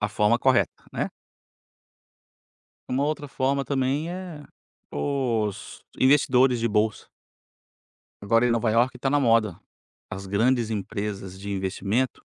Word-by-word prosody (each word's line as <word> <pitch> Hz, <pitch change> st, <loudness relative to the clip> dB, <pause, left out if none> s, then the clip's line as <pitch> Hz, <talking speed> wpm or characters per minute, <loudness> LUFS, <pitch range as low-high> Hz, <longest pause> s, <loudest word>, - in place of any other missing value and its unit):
a 105 Hz, -, 0 dB
forma 105 Hz, +2 st, +2 dB
correta, 130 Hz, 0 st, +3 dB, 0.2 s
né? -, -, -2 dB, 1.8 s
Uma 130 Hz, +2 st, 0 dB
outra 150 Hz, 0 st, -2 dB
forma 135 Hz, +1 st, 0 dB
também 140 Hz, +3 st, 0 dB
é 180 Hz, -4 st, -7 dB, 0.5 s
os 115 Hz, -, -2 dB, 0.2 s
investidores 130 Hz, -2 st, +4 dB
de 115 Hz, -, +1 dB
bolsa. 105 Hz, 0 st, 0 dB, 1.1 s
Agora, 115 Hz, +4 st, +3 dB
em -, -, +2 dB
Nova 115 Hz, -1 st, +1 dB
Iorque, 120 Hz, +4 st, +2 dB
tá 135 Hz, -, -1 dB
na 145 Hz, +1 st, +3 dB
moda. 115 Hz, -, +2 dB, 0.5 s
As 95 Hz, +1 st, -6 dB
grandes 115 Hz, +4 st, +1 dB
empresas 100 Hz, -2 st, -4 dB
de 100 Hz, +1 st, -6 dB
investimento 100 Hz, +6 st, -1 dB
120 Hz, 120 wpm, -25 LUFS, 105-135 Hz, 1.8 s, investidores